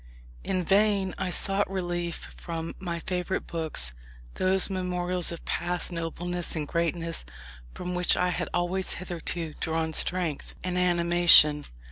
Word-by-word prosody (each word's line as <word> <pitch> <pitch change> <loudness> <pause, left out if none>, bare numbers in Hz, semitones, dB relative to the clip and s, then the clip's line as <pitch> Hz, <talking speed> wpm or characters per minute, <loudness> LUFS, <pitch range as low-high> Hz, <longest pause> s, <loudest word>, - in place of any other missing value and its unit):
In 185 -1 -1
vain 195 0 +2
I 190 -1 -2
sought 195 +2 +4
relief 175 -3 -4
from 165 -1 -6
my 175 -3 -4
favourite 180 +1 -3
books; 155 - 0 0.4
those 185 0 +4
memorials 180 -2 +1
of 170 - -9
past 175 +1 0
nobleness 175 +1 -4
and 150 -2 -3
greatness 170 0 -2 0.5
from 180 0 -5
which 180 0 +2
I 180 - +1
had 180 - -3
always 180 +2 -1
hitherto 170 -2 -4
drawn 160 0 -2
strength 170 -3 0
and 180 -1 -3
animation. 170 -4 +5
175 Hz, 130 wpm, -27 LUFS, 165-180 Hz, 0.5 s, animation